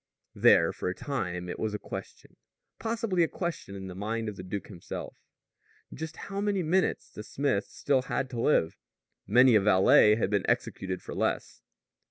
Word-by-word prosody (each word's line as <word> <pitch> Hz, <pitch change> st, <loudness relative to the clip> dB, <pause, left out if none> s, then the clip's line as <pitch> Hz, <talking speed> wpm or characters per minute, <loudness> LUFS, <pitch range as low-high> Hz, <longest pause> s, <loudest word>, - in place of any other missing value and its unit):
There -, -, +5 dB
for -, -, -3 dB
a 90 Hz, -, -4 dB
time 90 Hz, -11 st, -3 dB
it 90 Hz, -, -6 dB
was 110 Hz, -1 st, -2 dB
a -, -, -1 dB
question -, -, -9 dB, 0.4 s
possibly 225 Hz, -5 st, -1 dB
a 165 Hz, -, +4 dB
question 170 Hz, -, -5 dB
in 95 Hz, -1 st, -7 dB
the 95 Hz, -, -7 dB
mind 110 Hz, +4 st, -3 dB
of 105 Hz, -, -7 dB
the 95 Hz, -, -8 dB
duke 95 Hz, +1 st, -5 dB
himself 90 Hz, -5 st, -8 dB, 0.8 s
just 160 Hz, 0 st, -6 dB
how 200 Hz, 0 st, -5 dB
many 205 Hz, -3 st, 0 dB
minutes 180 Hz, +4 st, 0 dB
the -, -, -8 dB
smith 110 Hz, -2 st, -1 dB
still 135 Hz, -2 st, 0 dB
had 130 Hz, +1 st, -2 dB
to 120 Hz, -2 st, -3 dB
live. 80 Hz, -, +2 dB, 0.5 s
Many 125 Hz, +5 st, +6 dB
a 105 Hz, -, +6 dB
valet 105 Hz, +1 st, +6 dB
had 105 Hz, -3 st, -1 dB
been 100 Hz, -2 st, +1 dB
executed 95 Hz, -1 st, -2 dB
for -, -, -7 dB
less. -, -, -2 dB
110 Hz, 180 wpm, -29 LUFS, 95-155 Hz, 0.8 s, Many